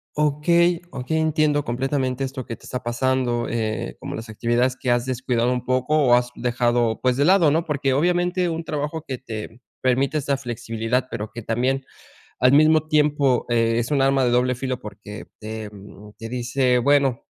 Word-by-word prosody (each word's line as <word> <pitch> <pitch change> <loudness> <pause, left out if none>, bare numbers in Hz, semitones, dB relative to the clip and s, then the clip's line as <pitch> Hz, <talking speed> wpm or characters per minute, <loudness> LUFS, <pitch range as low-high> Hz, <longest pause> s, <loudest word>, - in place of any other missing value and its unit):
Okey 165 +4 +2
okey, 135 +5 -3
entiendo 155 -2 +1
completamente 130 +1 -1
esto 130 -2 -5
que 115 - -6
te - - -18
está 125 - -5
pasando, 120 0 0
eh, 110 -2 -3
como - - -6
las 110 0 -8
actividades 120 +3 0
que 130 - -4
has 120 0 +2
descuidado 125 -1 0
un 125 -1 -2
poco, 130 +4 +1
o 130 -5 +4
has 125 0 +1
dejado, 120 -1 0
pues, 125 -1 +1
de 140 - +3
lado, 175 -4 +5
¿no?, 165 +3 +1
porque 140 -3 0
obviamente 175 +3 +1
un 165 0 -3
trabajo 150 0 -4
que 130 - -3
te 115 0 -8 0.2
permite 130 +3 +1
esta 140 -1 0
flexibilidad, 120 0 -2
pero 110 -2 -5
que 120 -1 -8
también 130 +4 -1 0.6
al 125 +2 +5
mismo 155 +1 +5
tiempo, 145 -4 +2
eh, 115 -1 +2
es 120 +3 -2
un 140 -2 +2
arma 135 0 +3
de 120 - +2
doble 125 +1 +2
filo 130 0 -3
porque 105 0 -9
te, 110 0 -6
mm, 105 +1 -13
te 115 - -7
dice 125 +1 +1
bueno, 135 -1 +2
130 Hz, 185 wpm, -22 LUFS, 120-145 Hz, 0.6 s, lado